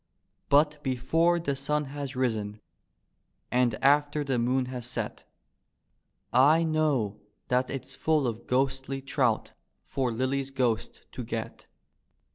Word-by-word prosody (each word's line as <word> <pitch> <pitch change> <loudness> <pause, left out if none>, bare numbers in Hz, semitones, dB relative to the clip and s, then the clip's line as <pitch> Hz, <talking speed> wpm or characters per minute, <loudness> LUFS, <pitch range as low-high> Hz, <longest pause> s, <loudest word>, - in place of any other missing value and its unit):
But 150 +1 +4
before 160 +7 +2
the 145 -4 -1
sun 150 +2 -1
has 140 -2 -5
risen 110 -5 -1 0.9
and 125 -2 +2
after 145 +1 +3
the 135 -4 0
moon 125 +2 +1
has 125 -2 -5
set 125 - -4 1.1
I 145 +6 +6
know 145 -10 0 0.3
that 125 +1 +2
it's 135 -2 -5
full 155 -3 +1
of 115 -1 -4
ghostly 135 +1 0
trout 135 - 0 0.3
for 130 -3 -1
Lilly's 130 +3 -1
ghost 120 -4 -1
to - - -6
get. - - -5
135 Hz, 120 wpm, -28 LUFS, 125-145 Hz, 1.1 s, I